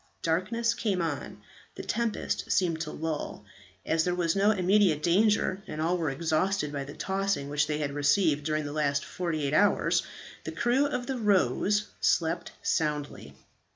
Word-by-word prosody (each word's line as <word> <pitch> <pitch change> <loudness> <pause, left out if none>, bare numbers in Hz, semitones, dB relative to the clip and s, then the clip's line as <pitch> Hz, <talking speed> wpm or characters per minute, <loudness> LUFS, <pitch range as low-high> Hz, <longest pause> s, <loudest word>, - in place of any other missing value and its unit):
Darkness 215 +8 +1
came 205 -6 -1
on; 145 -10 -4 0.3
the - - -6
tempest 235 -1 -2
seemed 165 -4 +1
to 155 -1 -4
lull. 160 -1 -4 0.4
As 160 0 +2
there 180 +1 0
was 170 -1 0
no 200 +1 +4
immediate 190 -5 +3
danger, 195 +2 +2
and 155 - -6
all 165 +3 +1
were 165 -4 -1
exhausted 160 +3 0
by 140 -1 -3
the 145 - -9
tossing 195 -7 -1
which 150 +1 +1
they 150 - -1
had 145 -2 -2
received 145 +1 +2
during 155 0 -1
the 145 - -5
last 140 -2 0
forty 170 -4 -3
eight 140 - -1
hours, 205 +6 +3 0.4
the - - -5
crew 260 +4 +2
of 250 -3 -3
the 260 0 -3
"Rose" 205 - +2
slept 170 0 +1
soundly. 150 - -2
165 Hz, 165 wpm, -28 LUFS, 150-200 Hz, 0.4 s, no